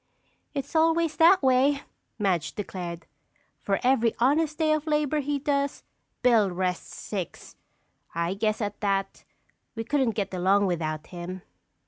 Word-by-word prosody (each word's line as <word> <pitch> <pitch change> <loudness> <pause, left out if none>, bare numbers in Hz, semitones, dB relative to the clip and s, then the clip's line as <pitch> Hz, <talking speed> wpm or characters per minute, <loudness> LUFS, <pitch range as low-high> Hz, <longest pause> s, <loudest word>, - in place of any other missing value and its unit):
"It's 280 +3 -4
always 325 0 +3
that 340 +1 +6
way," 270 +2 +3 0.4
Madge 190 -7 0
declared. 175 -4 -5 0.5
"For 195 -1 0
every 240 -3 +3
honest 300 +5 +2
day 315 -1 +2
of 310 +1 -2
labor 300 -1 +1
he 290 0 -1
does, 280 0 -1 0.4
Bill 230 -5 +5
rests 180 0 -3
six! 190 -5 -6 0.6
I 170 +2 0
guess 215 +2 -1
at 205 -1 -3
that 195 -1 -1 0.5
we 225 - -3
couldn't 260 -2 +1
get 195 -3 -2
along 190 +3 +3
without 155 -4 -2
him." 180 +1 -7
225 Hz, 135 wpm, -26 LUFS, 185-285 Hz, 0.6 s, that